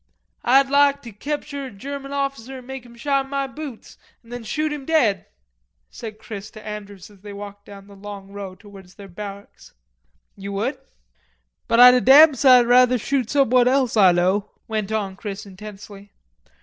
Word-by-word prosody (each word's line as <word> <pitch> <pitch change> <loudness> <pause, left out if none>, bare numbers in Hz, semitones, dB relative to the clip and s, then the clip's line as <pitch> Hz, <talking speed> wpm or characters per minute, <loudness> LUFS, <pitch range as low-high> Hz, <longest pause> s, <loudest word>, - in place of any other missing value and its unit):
"Ah'd 270 +3 +4
lahk 280 0 +3
te 235 - -9
cepture 285 +3 -5
a - - -11
German 275 +6 -8
officer 275 -2 -4
an' 255 - -12
make 265 -1 -8
him 235 - -16
shine 270 +2 -1
ma 275 0 -1
boots 270 -3 -10 0.2
an' 230 - -18
then 245 -1 -6
shoot 305 +7 -2
him 295 -2 -7
dead," 245 - +1 0.6
said 220 -2 -9
Chris 215 -2 -9
to 215 0 -13
Andrews 205 -2 -9
as 200 -2 -20
they 205 0 -10
walked 205 0 -10
down 200 -1 -12
the 200 0 -15
long 200 0 -10
row 200 -2 -8
towards 195 -2 -15
their 200 -1 -12
barracks. 200 +2 -10 0.6
"You 200 0 -7
would?" 225 +8 -2 0.9
"But 230 - +2
Ah'd 250 0 +10
a 250 - +3
damn 290 +7 +8
side 255 -2 +5
rather 250 +1 +5
shoot 255 0 -2
somebody 255 -3 +3
else 260 -3 +1
Ah 195 -4 +6
know," 185 +4 +1 0.2
went 215 -2 -3
on 200 -3 -2
Chris 205 0 -7
intensely. 200 0 -12
225 Hz, 175 wpm, -22 LUFS, 200-270 Hz, 0.9 s, Ah'd